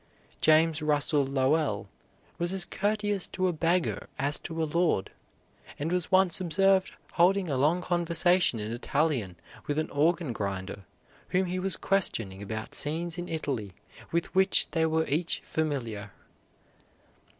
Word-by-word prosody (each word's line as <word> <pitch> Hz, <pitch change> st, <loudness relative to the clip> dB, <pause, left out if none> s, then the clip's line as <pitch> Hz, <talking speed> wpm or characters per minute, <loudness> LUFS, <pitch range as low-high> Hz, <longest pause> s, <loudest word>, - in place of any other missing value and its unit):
James 160 Hz, 0 st, +4 dB
Russell 145 Hz, -1 st, +1 dB
Lowell 135 Hz, -4 st, 0 dB, 0.5 s
was 175 Hz, +2 st, +2 dB
as 190 Hz, -2 st, +2 dB
courteous 205 Hz, -1 st, -1 dB
to 185 Hz, 0 st, -1 dB
a 180 Hz, -, 0 dB
beggar 170 Hz, +2 st, 0 dB
as 145 Hz, +2 st, +1 dB
to 165 Hz, -1 st, -4 dB
a -, -, +1 dB
lord, 160 Hz, -, 0 dB, 0.7 s
and 155 Hz, +4 st, -3 dB
was 180 Hz, 0 st, 0 dB
once 185 Hz, -1 st, +5 dB
observed 190 Hz, +2 st, +2 dB, 0.2 s
holding 180 Hz, 0 st, +3 dB
a -, -, 0 dB
long 155 Hz, +7 st, +2 dB
conversation 175 Hz, -3 st, +2 dB
in 105 Hz, +2 st, -4 dB
Italian 125 Hz, -, -1 dB, 0.3 s
with 145 Hz, -, -1 dB
an 155 Hz, -, -2 dB
organ 160 Hz, -1 st, +1 dB
grinder 100 Hz, -2 st, -5 dB, 0.4 s
whom 185 Hz, +1 st, +1 dB
he 180 Hz, +1 st, -3 dB
was 190 Hz, 0 st, +2 dB
questioning 110 Hz, -, 0 dB
about 110 Hz, +2 st, -6 dB
scenes 165 Hz, +3 st, +1 dB
in 175 Hz, -, -6 dB
Italy 135 Hz, -, -3 dB, 0.4 s
with 170 Hz, 0 st, -1 dB
which 190 Hz, 0 st, +3 dB
they 160 Hz, -1 st, +1 dB
were 160 Hz, 0 st, +1 dB
each 165 Hz, +5 st, -1 dB
familiar. 120 Hz, -10 st, -3 dB
160 Hz, 140 wpm, -28 LUFS, 140-180 Hz, 0.7 s, once